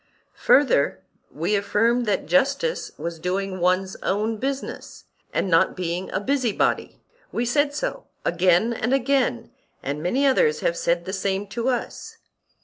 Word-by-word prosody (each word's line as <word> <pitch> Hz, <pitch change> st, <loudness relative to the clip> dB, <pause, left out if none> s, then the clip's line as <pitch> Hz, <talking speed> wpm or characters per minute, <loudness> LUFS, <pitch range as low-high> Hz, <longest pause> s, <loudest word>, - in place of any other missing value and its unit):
Further, 260 Hz, -, +4 dB, 0.3 s
we 170 Hz, +7 st, -1 dB
affirmed 230 Hz, +4 st, +1 dB
that 205 Hz, -, 0 dB
justice 280 Hz, -, +1 dB
was 170 Hz, -1 st, -5 dB
doing 185 Hz, +2 st, -2 dB
one's 185 Hz, +2 st, +1 dB
own 215 Hz, +3 st, -1 dB
business, 270 Hz, +4 st, -5 dB, 0.3 s
and -, -, 0 dB
not 165 Hz, -2 st, +3 dB
being 180 Hz, 0 st, -3 dB
a -, -, 0 dB
busybody; 250 Hz, 0 st, 0 dB, 0.3 s
we 240 Hz, -, -1 dB
said 285 Hz, +4 st, +1 dB
so -, -, -4 dB, 0.2 s
again 180 Hz, +6 st, +3 dB
and 240 Hz, +3 st, 0 dB
again, 260 Hz, -2 st, 0 dB, 0.3 s
and 145 Hz, +2 st, -3 dB
many 250 Hz, -, +1 dB
others 155 Hz, -, +3 dB
have 170 Hz, -, +1 dB
said 170 Hz, 0 st, 0 dB
the 190 Hz, -, -5 dB
same 195 Hz, 0 st, -1 dB
to 235 Hz, +5 st, -1 dB
us. 245 Hz, -2 st, -4 dB
205 Hz, 140 wpm, -23 LUFS, 180-260 Hz, 0.3 s, Further